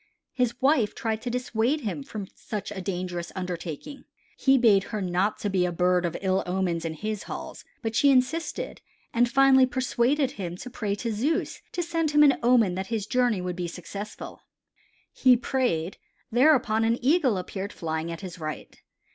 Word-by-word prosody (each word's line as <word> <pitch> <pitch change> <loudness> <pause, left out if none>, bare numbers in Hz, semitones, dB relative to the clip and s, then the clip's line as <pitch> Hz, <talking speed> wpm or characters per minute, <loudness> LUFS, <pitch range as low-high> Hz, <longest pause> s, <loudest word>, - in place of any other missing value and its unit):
His 245 -2 0
wife 265 -6 +2
tried 220 -1 -2
to 245 - -3
dissuade 250 +3 0
him 190 - -3
from 200 +8 -6
such 210 -2 -6
a 195 -2 -5
dangerous 180 -2 -4
undertaking, 180 - -6 0.3
he 270 0 +4
bade 210 -6 +4
her 215 - -4
not 185 +2 0
to - - -1
be 185 -2 +2
a 180 - 0
bird 180 +1 +2
of 170 - -4
ill 190 0 +2
omen 180 -2 0
in 160 -1 -3
his 215 +3 -4
halls, - - -7 0.2
but 225 0 -2
she 280 +5 +5
insisted, 275 +5 0 0.3
and 240 +1 +3
finally 265 0 +6
persuaded 260 +2 +1
him 185 -9 -5
to 250 - -8
pray 210 -5 -2
to 230 +2 -3
Zeus 285 +10 -1
to 350 - -1
send 330 -2 0
him 295 0 +5
an 285 -2 +5
omen 235 -6 +4
that 190 +1 -4
his 220 -4 -2
journey 245 -4 +1
would 180 -1 -3
be 175 -1 -3
successful. 200 +5 -8 0.7
He 255 -2 +5
prayed; 235 -9 -1 0.3
thereupon 245 -3 +4
an 230 +1 +2
Eagle 275 - +3
appeared 190 +2 -5
flying 160 0 -3
at 165 - -6
his 180 -2 -8
right. 155 -1 -7
215 Hz, 180 wpm, -26 LUFS, 180-255 Hz, 0.7 s, finally